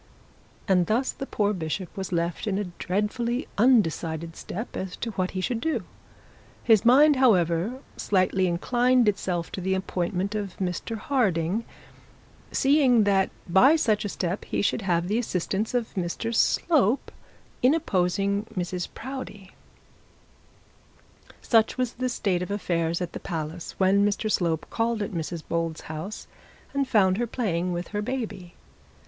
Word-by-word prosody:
And 180 Hz, -4 st, +3 dB
thus 245 Hz, +5 st, +1 dB
the 270 Hz, -, -7 dB
poor 205 Hz, 0 st, 0 dB
bishop 175 Hz, 0 st, -4 dB
was 190 Hz, -1 st, -5 dB
left 170 Hz, +3 st, -1 dB
in 195 Hz, -2 st, 0 dB
a 205 Hz, -, 0 dB, 0.2 s
dreadfully 225 Hz, +6 st, -1 dB
undecided 165 Hz, -8 st, +2 dB
state 220 Hz, +6 st, -6 dB
as 185 Hz, -1 st, -4 dB
to 235 Hz, -, -4 dB
what 185 Hz, -2 st, -2 dB
he -, -, 0 dB
should 230 Hz, +4 st, -2 dB
do. 320 Hz, 0 st, -1 dB, 0.8 s
His 220 Hz, -3 st, +5 dB
mind, 280 Hz, +4 st, +6 dB
however, 200 Hz, -1 st, +2 dB, 0.2 s
slightly 190 Hz, -1 st, +2 dB
inclined 245 Hz, +7 st, +2 dB
itself 180 Hz, -4 st, -1 dB
to 190 Hz, -, -5 dB
the 190 Hz, +1 st, 0 dB
appointment 190 Hz, +1 st, -2 dB
of 205 Hz, -4 st, -4 dB
Mr 185 Hz, +4 st, -3 dB
Harding, 210 Hz, -, 0 dB, 0.9 s
seeing 270 Hz, -5 st, +4 dB
that 195 Hz, -1 st, +3 dB, 0.2 s
by 220 Hz, -, +6 dB
such 220 Hz, -9 st, +1 dB
a 205 Hz, -, -3 dB
step, 185 Hz, +1 st, -3 dB
he -, -, -1 dB
should 210 Hz, -, +1 dB
have 175 Hz, -3 st, 0 dB
the 215 Hz, +4 st, +1 dB
assistance 210 Hz, +1 st, -2 dB
of 240 Hz, -2 st, -1 dB
Mr 190 Hz, +5 st, -3 dB
Slope 265 Hz, -, +2 dB, 0.5 s
in 260 Hz, +5 st, +5 dB
opposing 200 Hz, -, 0 dB
Mrs 180 Hz, 0 st, -2 dB
Proudie. 240 Hz, -7 st, -7 dB, 1.9 s
Such 225 Hz, 0 st, +3 dB
was 250 Hz, -2 st, -1 dB
the 255 Hz, +1 st, -2 dB
state 195 Hz, -7 st, 0 dB
of 180 Hz, -, -4 dB
affairs 170 Hz, -4 st, -1 dB
at 175 Hz, -, -6 dB
the -, -, -5 dB
palace, 160 Hz, 0 st, -5 dB
when 195 Hz, +1 st, +4 dB
Mr 205 Hz, +1 st, 0 dB
Slope 165 Hz, -5 st, 0 dB
called 225 Hz, -1 st, 0 dB
at 205 Hz, -, -5 dB
Mrs 165 Hz, -2 st, -4 dB
Bold's 165 Hz, -1 st, -2 dB
house, 160 Hz, +7 st, -6 dB, 0.5 s
and 275 Hz, -1 st, 0 dB
found 195 Hz, -4 st, +3 dB
her 240 Hz, -, 0 dB
playing 185 Hz, -7 st, -1 dB
with 175 Hz, 0 st, -4 dB
her 205 Hz, -1 st, -2 dB
baby. 210 Hz, -7 st, -5 dB
200 Hz, 150 wpm, -26 LUFS, 175-235 Hz, 1.9 s, mind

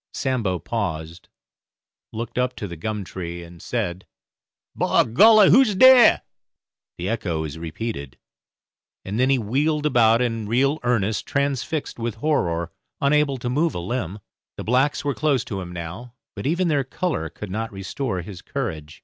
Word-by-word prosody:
Sambo 120 Hz, -9 st, -1 dB
paused, 85 Hz, -3 st, -4 dB, 0.8 s
looked 115 Hz, +2 st, -4 dB
up 125 Hz, 0 st, 0 dB
to 100 Hz, -, -5 dB
the 85 Hz, -, -7 dB
gum 105 Hz, +5 st, -4 dB
tree, 85 Hz, -2 st, -6 dB
and 85 Hz, -1 st, -13 dB
said, 85 Hz, +2 st, -3 dB, 0.7 s
"By -, -, +3 dB
golly, 210 Hz, -, +6 dB
who's 230 Hz, -2 st, +5 dB
dere?" 260 Hz, +2 st, +7 dB, 0.7 s
The 90 Hz, -, -4 dB
echo 95 Hz, -7 st, -2 dB
was 80 Hz, 0 st, -6 dB
repeated, 80 Hz, -, -5 dB, 0.9 s
and 100 Hz, +4 st, -3 dB
then 130 Hz, +1 st, +3 dB
he 135 Hz, -, +4 dB
wheeled 145 Hz, +7 st, 0 dB
about 115 Hz, -5 st, +4 dB
in 115 Hz, -3 st, -1 dB
real 135 Hz, +7 st, +2 dB
earnest, 110 Hz, -4 st, 0 dB
transfixed 140 Hz, 0 st, -2 dB
with 115 Hz, -2 st, -3 dB
horror, 85 Hz, -, 0 dB, 0.3 s
unable 140 Hz, -1 st, +2 dB
to 120 Hz, -, -5 dB
move 150 Hz, +5 st, 0 dB
a -, -, -2 dB
limb. 100 Hz, 0 st, -3 dB, 0.4 s
The -, -, -5 dB
blacks 130 Hz, +5 st, +1 dB
were 140 Hz, -, +1 dB
close 140 Hz, -3 st, +1 dB
to 100 Hz, -4 st, -4 dB
him 90 Hz, -1 st, -7 dB
now, 90 Hz, +9 st, -7 dB, 0.2 s
but -, -, -4 dB
even 175 Hz, +4 st, +1 dB
their 145 Hz, -4 st, +1 dB
colour 130 Hz, -, -3 dB
could 100 Hz, +4 st, -8 dB
not 110 Hz, +3 st, -3 dB
restore 95 Hz, +1 st, -4 dB
his 90 Hz, 0 st, -9 dB
courage. 75 Hz, -1 st, -5 dB
115 Hz, 160 wpm, -23 LUFS, 90-140 Hz, 0.9 s, dere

